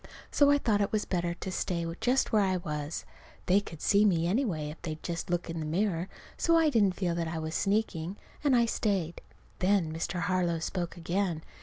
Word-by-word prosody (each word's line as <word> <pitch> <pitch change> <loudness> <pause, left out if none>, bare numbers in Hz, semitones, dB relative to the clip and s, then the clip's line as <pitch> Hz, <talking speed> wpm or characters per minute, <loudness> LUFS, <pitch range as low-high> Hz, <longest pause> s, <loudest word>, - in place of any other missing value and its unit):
So 285 -1 +5
I 285 - +6
thought 215 -7 +1
it 200 - 0
was 215 -1 0
better 175 -2 -1
to 190 - -5
stay 170 -2 -1
just 255 +2 +2
where 215 - +4
I 190 -2 +2
was. 150 -2 -4 0.4
They 185 +3 +5
could 165 -6 -10
see 200 +1 +4
me, 170 -6 +3
anyway, 175 - 0
if 155 - -12
they'd 155 -2 -5
just 170 -1 -4
look 175 0 -1
in 165 -1 -4
the 155 - -3
mirror. 180 +1 0 0.3
So 335 -1 +4
I 320 -2 +4
didn't 205 -7 +3
feel 175 -3 0
that 170 -1 -1
I 160 0 -3
was 160 0 -4
sneaking. 195 -3 0 0.3
And 280 -3 +4
I 235 -1 +5
stayed. 195 -7 -1 0.4
Then 185 -4 +2
Mr. 170 +2 -3
Harlow 180 -3 +1
spoke 175 +2 -3
again. 170 -1 -1
180 Hz, 205 wpm, -30 LUFS, 165-205 Hz, 0.4 s, I